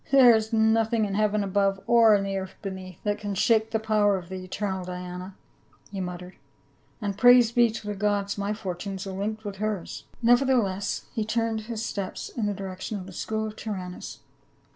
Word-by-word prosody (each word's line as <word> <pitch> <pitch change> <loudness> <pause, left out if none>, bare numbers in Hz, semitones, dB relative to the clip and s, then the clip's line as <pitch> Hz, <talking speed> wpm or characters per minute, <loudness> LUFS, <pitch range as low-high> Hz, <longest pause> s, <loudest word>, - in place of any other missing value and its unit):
" - - -25
There 255 -4 +8
is 220 +1 -1
nothing 220 0 +3
in 200 - -3
heaven 210 0 +1
above 195 0 +1
or 230 -2 +6
in 200 - +1
the 195 0 -2
earth 190 -1 -5
beneath 190 -3 -6
that 205 -1 -1
can 205 -1 -4
shake 220 +2 +3
the 220 - +1
power 215 -2 +2
of 175 -1 -9
the 185 -1 -6
eternal 190 0 -3
Diana," 180 +1 -7 0.6
he 195 -2 -4
muttered, 180 0 -6 0.7
"and 200 -1 -1
praise 245 -2 +7
be 240 -1 +4
to 220 -1 -7
the 210 - -2
gods, 200 0 0
my 200 0 -2
fortunes 195 -2 -5
are 195 - -5
linked 215 +3 -4
with 200 -1 -5
hers 210 -3 -3
!" - - -28
Nevertheless 235 -6 +2
he 225 - -1
turned 225 0 -1
his 225 -1 -3
steps 195 -2 -4
in 220 -4 -2
the 205 - 0
direction 190 +2 -5
of 185 - -7
the 190 - -10
school 220 +4 -2
of 215 0 -6
Tyrannus. 185 -5 -6
205 Hz, 200 wpm, -26 LUFS, 190-220 Hz, 0.7 s, There